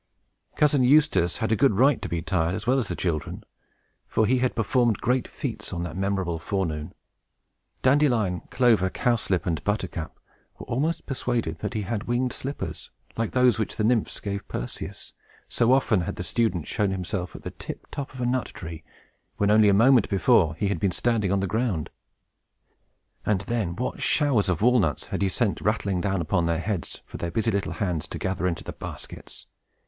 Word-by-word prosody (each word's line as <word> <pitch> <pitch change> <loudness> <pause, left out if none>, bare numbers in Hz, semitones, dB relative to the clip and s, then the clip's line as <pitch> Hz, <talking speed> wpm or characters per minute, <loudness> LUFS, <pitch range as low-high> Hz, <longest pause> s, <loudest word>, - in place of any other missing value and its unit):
Cousin 145 -3 +3
Eustace 135 - +4
had 110 - -1
a - - +4
good 135 +1 +4
right 130 +6 +4
to - - -4
be 85 -1 -2
tired, 85 -1 0
as 105 - -5
well 130 +3 +3
as 115 - -2
the - - -3
children, 80 -6 -3 0.6
for 110 - +2
he 125 +4 +2
had 125 0 0
performed 120 -1 +2
great 125 +1 +1
feats - - -5
on 85 - -3
that 85 -2 -5
memorable 95 -3 -1
forenoon. 80 -5 -3 0.9
Dandelion, 125 -10 +3
Clover, 115 -7 +3
Cowslip, 115 -6 0
and 85 -3 -1
Buttercup 95 -6 -3 0.4
were - - -9
almost 150 +8 -1
persuaded 120 - -2
that 105 0 -4
he 105 - -1
had 105 +1 -3
winged 120 +1 0
slippers, 140 +2 -5 0.3
like 115 -1 -2
those 125 -2 +4
which 110 - -2
the 110 - -1
Nymphs 115 0 +1
gave 100 -1 -4
Perseus; - - -6 0.3
so 115 +1 +2
often 130 -7 +3
had 85 - -4
the - - -5
student 90 -5 0
shown 105 -2 0
himself 95 -1 -3
at - - -10
the - - -5
tiptop 140 -1 -7
of - - -8
a - - 0
nut 125 +1 0
tree, 80 -2 -8 0.5
when 105 0 +2
only 105 -1 +6
a - - +6
moment 115 +2 +5
before 95 -5 +3
he 100 +4 -1
had 100 -4 -1
been 100 - +2
standing 110 -2 0
on 100 -1 +2
the - - 0
ground. 105 -5 -1 1.3
And 100 -3 +1
then, 100 -4 -2
what 125 +5 -3
showers 135 -10 +2
of 95 +2 0
walnuts 115 - +3
had - - -1
he 95 - +2
sent - - 0
rattling 95 -3 0
down 95 -1 0
upon 85 +1 +1
their 85 -1 +1
heads, 95 -1 -3
for - - -9
their 85 - -3
busy 110 +5 0
little 100 -1 -1
hands 90 -8 -2
to - - -6
gather 95 -1 -1
into 85 -2 -2
the - - -6
baskets! - - -9
105 Hz, 190 wpm, -25 LUFS, 90-120 Hz, 1.3 s, only